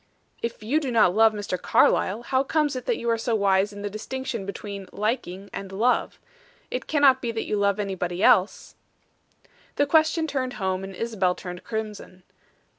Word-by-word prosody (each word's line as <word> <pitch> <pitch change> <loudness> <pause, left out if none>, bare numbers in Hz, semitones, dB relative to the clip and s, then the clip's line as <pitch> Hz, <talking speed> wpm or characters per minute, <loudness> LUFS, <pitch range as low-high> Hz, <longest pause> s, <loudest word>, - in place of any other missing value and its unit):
"If 235 -2 -4
you 270 +9 +1
do 285 -4 -3
not 220 -7 +4
love 220 +2 +5
Mr. 205 -4 -4
Carlyle, 210 +5 +2
how 260 +2 +1
comes 295 -1 0
it 255 - -6
that 480 - +1
you 235 - -5
are 230 - 0
so 230 0 0
wise 200 -1 +2
in 205 0 -9
the - - -1
distinction 235 0 -5
between 200 -1 -6
'liking' 200 -3 -3
and 195 -1 -6
'love?' 225 +6 +1 0.5
It - - -4
cannot 280 -4 +4
be 240 - -2
that 225 -1 -3
you - - -1
love 200 0 +1
anybody 190 -2 -2
else?" 215 -6 +3 1.0
The 285 - +3
question 315 +2 +3
turned 260 -4 -2
home, 190 -3 -2
and 195 0 -7
Isabel 195 -5 0
turned 180 -2 -8
crimson. 215 -5 -6
215 Hz, 180 wpm, -25 LUFS, 195-255 Hz, 1.0 s, love